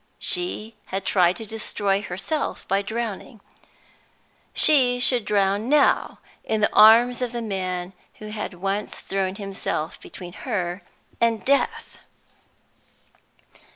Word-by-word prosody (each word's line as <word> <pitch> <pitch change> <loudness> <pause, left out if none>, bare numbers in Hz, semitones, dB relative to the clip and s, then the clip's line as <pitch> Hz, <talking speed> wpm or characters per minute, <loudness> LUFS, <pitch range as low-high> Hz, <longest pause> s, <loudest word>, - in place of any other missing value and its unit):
She 230 -12 -2
had 195 +1 -4
tried 180 -2 +3
to 225 - -7
destroy 205 -2 -1
herself 210 - -4
by 195 +1 +1
drowning; 225 +1 -5 1.1
she 255 -5 +4
should 245 -3 +3
drown 205 +2 +1
now, 295 0 +3 0.3
in 220 - -1
the 210 - +2
arms 235 +4 +6
of 245 -1 -2
the 240 - -3
man 185 -3 -3 0.2
who 215 - -9
had 210 -3 -5
once 195 +3 -3
thrown 190 -1 -2
himself 195 -5 -4
between 175 -2 -10
her 185 -7 -3 0.4
and 230 -2 +1
death! 280 +1 0
210 Hz, 120 wpm, -23 LUFS, 195-235 Hz, 1.1 s, arms